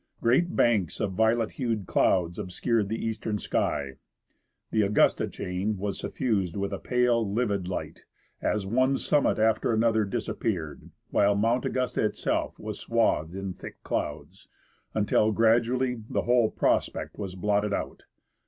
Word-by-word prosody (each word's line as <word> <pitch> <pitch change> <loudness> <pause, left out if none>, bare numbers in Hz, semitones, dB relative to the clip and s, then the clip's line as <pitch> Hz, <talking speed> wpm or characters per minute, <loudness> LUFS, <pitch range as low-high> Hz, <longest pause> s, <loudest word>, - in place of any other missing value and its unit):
Great 135 +10 +2
banks 105 -8 +2
of 105 -2 -1
violet 110 +3 +2
hued 115 -6 -2
clouds 85 -2 +1
obscured 100 +3 -1
the 110 +1 -3
eastern 110 -1 -2
sky; 70 -8 -2 0.7
the 110 - +2
Augusta 105 0 +3
chain 95 +4 -3
was 100 +1 -3
suffused 100 -9 -1
with 100 0 -2
a - - -3
pale, 120 -4 +1
livid 100 -5 0
light, 95 - -5 0.4
as 105 -2 0
one 130 +6 +2
summit 145 - +2
after 110 +1 +2
another 110 -1 +2
disappeared; 95 -4 -3 0.2
while 100 0 +3
Mount 115 +4 +1
Augusta 130 -1 -1
itself 105 - -1
was - - -6
swathed 80 +4 +1
in 95 -1 -4
thick - - -11
clouds, - - -4 0.5
until 105 0 +2
gradually 120 +2 +2
the - - 0
whole 120 -2 +3
prospect - - -1
was 95 -3 -5
blotted 105 +2 0
out. - - -4
110 Hz, 140 wpm, -27 LUFS, 100-115 Hz, 0.7 s, Augusta